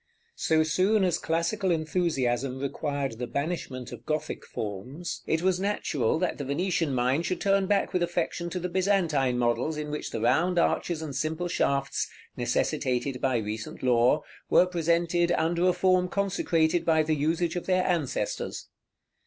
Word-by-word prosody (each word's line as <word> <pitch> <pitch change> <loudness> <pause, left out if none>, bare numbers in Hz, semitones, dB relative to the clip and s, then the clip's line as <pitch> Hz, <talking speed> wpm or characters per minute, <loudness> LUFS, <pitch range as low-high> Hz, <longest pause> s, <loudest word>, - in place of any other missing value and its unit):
So 160 0 +3
soon 190 +7 +2
as 180 -3 +1
the - - -12
classical 170 +5 0
enthusiasm 145 -6 0
required 140 -2 -3
the 125 - -3
banishment 140 -4 -4
of - - -9
Gothic 155 0 -3
forms, 120 - -5
it 160 +1 0
was 185 -1 +2
natural 160 - 0
that 175 -1 -1
the - - -2
Venetian 160 0 0
mind 130 +7 +1
should 185 - -2
turn 195 -1 +2
back 200 0 +1
with 180 - +1
affection 175 0 -1
to 180 - -3
the 180 - -2
Byzantine 170 -9 +1
models 125 +6 0
in 150 -1 -4
which 150 - -4
the 115 - -4
round 160 +11 +2
arches 170 -1 +1
and 145 -4 -5
simple 160 +5 -1
shafts, 140 -5 0 0.3
necessitated 125 +1 -1
by 130 -2 +2
recent 110 +2 -5
law, 125 +2 +3 0.3
were - - +6
presented 170 0 +1
under 170 +2 +1
a - - +5
form 185 0 +3
consecrated 175 -4 +1
by 160 -1 +3
the 155 0 0
usage 160 +4 0
of 175 - -4
their 185 -1 +2
ancestors. 165 -7 -2
160 Hz, 160 wpm, -27 LUFS, 135-180 Hz, 0.3 s, were